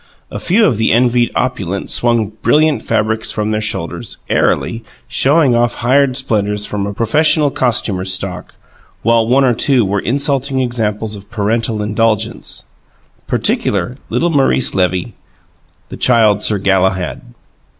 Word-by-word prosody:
A - - -5
few 215 +5 +2
of 120 - +1
the 110 - +2
envied 120 0 +2
opulent 100 -7 -2
swung 115 -3 0
brilliant 155 -1 +2
fabrics 110 +1 -1
from 105 0 -2
their 110 0 -1
shoulders, 95 -6 -4
airily, 115 - 0 0.3
showing 135 +1 +3
off 120 0 +1
hired 130 +2 +2
splendours 105 -5 -1
from 100 -1 -3
a 100 - -4
professional 150 +6 +2
costumer's 100 -8 -1
stock, 95 -1 -5 0.5
while 115 0 +3
one 135 +3 +3
or 125 - +3
two 125 0 +2
were 100 +1 -1
insulting 135 +3 0
examples 110 -4 -2
of 100 0 -12
parental 110 0 -1
indulgence, 110 +1 -1 0.6
particularly 105 +6 -1
little 170 0 0
Maurice 135 -3 +2
Levy, 90 -1 -1 0.8
the - - -8
Child 110 -4 +3
Sir 105 - +1
Galahad. 95 -2 0
115 Hz, 135 wpm, -15 LUFS, 105-130 Hz, 0.8 s, showing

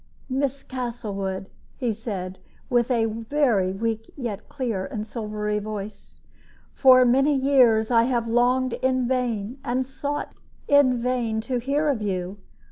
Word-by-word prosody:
"Miss 275 +1 -1
Castlewood," 205 -7 -4 0.3
he 245 -4 0
said, 195 -4 -5 0.3
with 240 0 +2
a 235 -3 +2
very 225 -3 +1
weak 225 +3 -3
yet 230 -6 -5
clear 235 -9 -3
and 220 -6 -5
silvery 210 -2 -3
voice, 210 0 -7 0.5
"for 255 -2 +6
many 270 +4 +3
years 255 -5 +4
I 230 -1 +5
have 240 -2 0
longed 245 +2 +2
in 255 -1 0
vain 245 -2 -1
and 255 +2 -1
sought 285 +2 -4 0.4
in 285 -3 +5
vain 235 -2 -1
to 250 +2 -2
hear 280 +5 0
of 270 -7 0
you. 190 -1 -3
235 Hz, 135 wpm, -24 LUFS, 215-260 Hz, 0.5 s, for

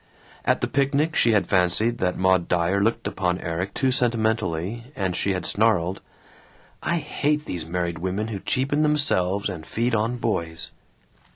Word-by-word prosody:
At - - +2
the - - +1
picnic 140 +3 +1
she 115 - +4
had 105 - +3
fancied 100 +6 +2
that 90 -1 0
Maud 95 -1 +3
Dyer 90 +3 +1
looked 115 +2 0
upon 90 -1 -1
Erik 90 +3 -3
too 130 -1 +2
sentimentally, 110 -4 0
and 95 -3 -1
she 100 - 0
had 90 - -3
snarled, 95 -4 +1 0.8
"I 170 - 0
hate 150 -1 -1
these 85 - -5
married 85 0 -2
women 95 +5 -2
who 105 -3 -4
cheapen 135 +8 0
themselves 105 -11 +2
and 90 -5 -6
feed 115 +8 -1
on 115 +3 +1
boys." 85 -8 -2
100 Hz, 160 wpm, -24 LUFS, 90-120 Hz, 0.8 s, she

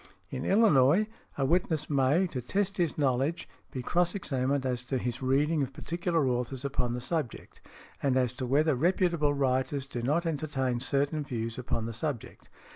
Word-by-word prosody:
In - - -4
Illinois, 195 - +5 0.3
a 135 - +1
witness 160 -1 +1
may, 145 +5 +3
to 135 -8 -4
test 195 - -1
his 170 -4 0
knowledge, 140 +3 0 0.2
be 130 - -5
cross 175 +6 +1
examined 135 -6 -1
as 125 -2 -1
to 125 +1 -2
his 120 0 -3
reading 145 +4 +2
of 135 -1 -2
particular 170 -1 -1
authors 125 +2 -2
upon 125 -3 -1
the 125 - -2
subject, 150 -3 -4 0.4
and 135 -2 +2
as 125 -2 +2
to 130 -1 -4
whether 150 +4 +3
reputable 170 0 +2
writers 130 0 0
do 125 -3 -5
not 150 +8 +1
entertain 140 -6 -1
certain 140 +4 0
views 115 -3 -4
upon 115 -2 -2
the 115 - -4
subject. 125 +1 -5
140 Hz, 170 wpm, -29 LUFS, 125-160 Hz, 0.4 s, Illinois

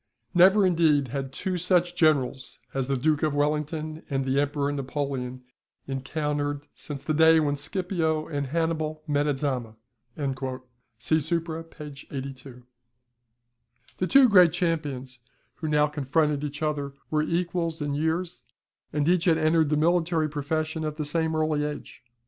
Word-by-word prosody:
"Never, 190 +3 +6
indeed, 160 -6 +3
had 135 +1 -4
two 180 +6 -3
such 175 0 +2
generals 140 -6 +1 0.2
as 135 -1 -1
the 135 -1 0
Duke 150 +3 +1
of 155 -2 +1
Wellington 150 +2 -1
and 135 -2 -1
the 135 +1 +2
Emperor 145 0 -1
Napoleon 135 -2 -3 0.4
encountered 145 +1 -2
since 140 -2 -7
the 155 - -1
day 160 +1 +6
when 145 -2 +1
Scipio 160 0 -1
and 145 -3 -3
Hannibal 155 0 -1
met 145 -1 +1
at 145 -2 0
Zama." 125 -6 -2 1.2
[See 155 +8 +1
SUPRA, 165 +1 -2
p. 165 -1 -12 0.3
82.] 135 -2 -7 1.4
The 185 - +1
two 270 +3 +7
great 180 -7 +6
champions, 145 -8 -2 0.4
who 160 - -4
now 150 -1 +3
confronted 150 0 0
each 150 +1 -4
other, 145 -2 -2 0.2
were 155 -1 +2
equals 170 0 -1
in 145 -1 -2
years, 160 0 -1 0.5
and 150 0 0
each 180 0 +3
had 165 -3 +4
entered 160 -1 +3
the 150 - +2
military 165 0 +2
profession 155 +2 -2
at 155 -1 -3
the 155 - -2
same 160 +1 0
early 155 -1 +1
age. 150 -3 -6
150 Hz, 150 wpm, -26 LUFS, 140-165 Hz, 1.4 s, two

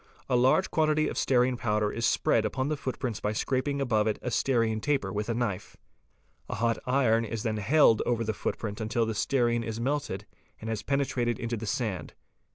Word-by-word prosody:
A - - +1
large 130 +9 +3
quantity 155 -1 +2
of - - -4
stearine 125 -1 +2
powder 105 -2 0
is 115 - 0
spread 115 - +2
upon 130 +6 -1
the 155 - 0
footprint 125 -5 -4
by 105 - -1
scraping 140 +5 -1
above 110 -5 +1
it 110 - 0
a 125 - -2
stearine 115 -4 +1
taper 130 -9 0
with 105 +2 -3
a 115 - 0
knife. 105 -5 -3 0.7
A - - -2
hot 115 +1 0
iron 125 -3 +3
is 115 -1 -4
then 110 -2 -1
held 115 +1 +4
over 115 -1 0
the 110 0 -1
footprint 105 +1 -4
until 115 +2 0
the 110 - -2
stearine 120 +1 +1
is 115 0 -4
melted 135 -5 -2 0.3
and 110 +1 -5
has 110 -2 -2
penetrated 130 -4 0
into 120 -1 -3
the 110 0 -6
sand. 105 -5 -3
115 Hz, 195 wpm, -28 LUFS, 110-130 Hz, 0.7 s, held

